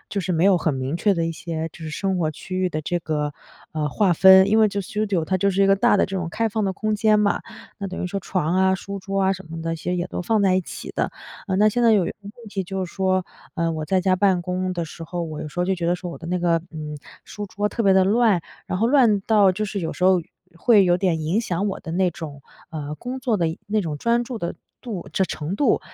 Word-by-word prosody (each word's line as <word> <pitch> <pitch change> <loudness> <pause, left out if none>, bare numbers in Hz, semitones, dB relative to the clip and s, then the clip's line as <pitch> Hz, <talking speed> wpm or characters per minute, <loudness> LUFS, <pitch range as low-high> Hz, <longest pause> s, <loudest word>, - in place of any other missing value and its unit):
就 200 - -2
是 180 +1 -2
没 165 +2 +2
有 195 -2 +6
很 160 -2 0
明 130 +4 -2
确 205 +3 +2
的 165 -1 0
一 - - -1
些 165 -1 -4
就 - - -14
是 160 -1 -5
生 190 +4 -1
活 155 -2 0
区 185 +5 -6
域 185 -1 +1
的 155 -3 -3
这 175 +4 -1
个， 150 -2 -2 0.4
嗯， 155 -1 -1
划 195 +2 +2
分。 190 +2 +7
因 220 - +4
为 220 - +6
就 200 -1 -2
studio， 200 -3 -1
它 185 - 0
就 200 +1 +2
是 195 +1 +2
一 - - +5
个 195 0 +5
大 205 - +4
的 - - +3
这 195 - -4
种 175 -3 -2
开 225 +5 0
放 215 0 -1
的 190 - 0
空 215 +2 -1
间 215 0 +3
嘛， 200 -1 +1 0.4
那 200 - -4
等 185 - -5
于 - - -1
说 195 +2 -3
床 180 -2 -1
啊， 190 0 +4
书 200 +1 -6
桌 195 +1 -2
啊， 190 0 +3
什 190 -3 -8
么 165 0 -6
的 165 0 -2
些 175 +3 -3
也 180 0 -1
都 - - -4
放 215 +2 +1
在 190 -1 +4
一 - - +2
起 - - -8
的。 - - 0 0.3
嗯， 190 -1 0
那 215 +1 +6
现 240 +3 0
在 230 -1 +6
有 190 -5 +3
一 - - -2
个 - - -10
问 205 +1 -9 0.2
题 195 -2 -3
就 190 0 -3
是 175 - -10
说， 185 -1 +1 0.3
嗯， 165 -2 0
我 155 - -3
在 190 +3 +1
家 185 0 +2
办 185 -2 +2
公 185 +1 -2
的 170 -2 -2
时 165 +1 -10
候， 175 +1 -4
我 155 -2 -5
有 150 - -5
时 165 - -10
候 - - +2
就 190 +1 +1
觉 170 -2 -3
得 175 - +2
说 180 -1 -6
我 - - -8
的 165 - -9
那 180 +1 -1
个， 170 -1 +2
嗯， 150 -2 -6 0.3
书 210 - -7
桌 205 +2 -2
特 230 - -2
别 195 - +5
的 190 -1 +5
乱。 215 -3 +3 0.3
然 180 - -2
后 225 - +2
乱 235 -6 +4
到 205 -2 +4
就 215 +4 -2
是 200 -1 -3
有 165 - -3
时 - - -8
候 185 -1 +5 0.4
会 205 +1 +5
有 175 0 +3
点 175 -4 0
影 170 +8 0
响 190 -2 -2
我 - - -4
的 160 - -7
那 185 +1 +2
种， 145 -4 -8 0.3
呃， 150 -2 -5
工 250 +10 -6
作 240 -5 +1
的 170 -4 +1 0.2
那 215 +1 +1
种 155 -6 -4
专 235 +5 +2
注 240 -2 -6
的 170 -2 -3 0.3
度 215 -8 -6
程 190 +2 +1
程 160 +6 -4
度。 285 - +2
185 Hz, 315 characters per minute, -23 LUFS, 170-200 Hz, 0.4 s, 分